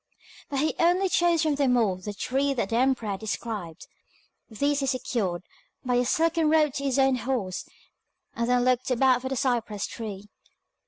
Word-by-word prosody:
But 275 -2 -1
he 310 - +1
only 360 +3 +3
chose 345 -2 +2
from 310 -2 +2
them 275 -3 +2
all 210 -6 +2
the 185 +3 -6
three 270 +7 -1
that 230 -6 -1
the 225 - -1
emperor 255 -3 +1
had 195 -1 -3
described. 205 -6 -5 0.6
These 285 +6 0
he 275 - -1
secured 235 -10 -2 0.4
by 250 - 0
a 245 0 +2
silken 325 +3 +2
rope 305 -3 +3
to 280 - -4
his 270 -1 0
own 270 -1 +3
horse, 230 -6 -3 0.7
and 235 +1 -1
then 250 0 +3
looked 255 0 +1
about 255 0 +3
for 260 - -4
the 270 - -2
cypress 230 -5 -1
tree. 210 -3 -7
255 Hz, 180 wpm, -26 LUFS, 220-280 Hz, 0.7 s, only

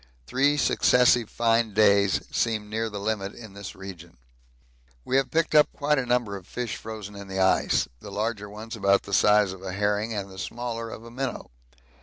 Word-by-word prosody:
Three 140 - +2
successive 125 -3 +4
fine 115 -2 +1
days 100 -2 +4
seem 110 -2 -1
near 110 +1 -1
the 105 -1 -6
limit 100 -1 -2
in 110 -4 -11
this 100 -1 -8
region. 90 -6 -10 0.9
We 130 - -1
have 135 - +1
picked 165 0 0
up 150 -1 +6
quite 150 0 +1
a 125 - -3
number 120 -4 +1
of 95 -1 -10
fish 120 -3 -4
frozen 105 -2 -8
in 100 0 -9
the 95 0 -4
ice 95 0 +3
the - - -10
larger 105 0 -3
ones 110 +3 -8
about 100 -2 +3
the 100 - -8
size 105 0 +4
of 95 - -12
a 95 -1 -5
herring 105 +3 0
and 100 -3 -4
the 95 - -10
smaller 115 +1 -4
of 115 - -9
a 115 - -11
minnow. 130 - -4
105 Hz, 195 wpm, -26 LUFS, 100-120 Hz, 0.9 s, up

